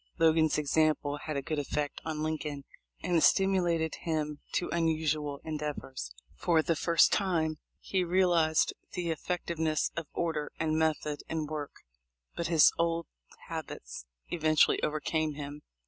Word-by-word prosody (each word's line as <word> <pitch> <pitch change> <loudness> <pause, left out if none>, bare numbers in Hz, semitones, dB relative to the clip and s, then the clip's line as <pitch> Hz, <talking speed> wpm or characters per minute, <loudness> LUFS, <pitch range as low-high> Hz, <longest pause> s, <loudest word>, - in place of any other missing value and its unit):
Logan's 160 -1 +4
example 150 -1 +1
had 150 0 -4
a 140 - -2
good 155 +2 -2
effect 145 0 -2
on 155 -1 -3
Lincoln, 150 -2 -3 0.4
and 175 +1 0
it 165 - +4
stimulated 175 -5 +3
him 150 -3 -2
to 175 - 0
unusual 155 -3 0
endeavors. 150 - -4 0.2
For 160 - +2
the 165 - +1
first 170 +2 +4
time 160 -6 +1 0.2
he 190 -2 0
realized 175 -3 +3 0.2
the 175 -2 -1
effec 180 +3 -3
tiveness 160 -2 0
of 165 -3 -4
order 160 -3 -1
and 155 -1 +1
method 155 -2 0
in 160 -1 -1
work, 150 -1 -6 0.5
but 170 - -2
his 165 -2 +6
old 170 0 +1 0.4
habits - - -7 0.2
eventually 155 -2 +3
overcame 155 0 -1
him. 145 0 -7
155 Hz, 140 wpm, -30 LUFS, 150-165 Hz, 0.5 s, his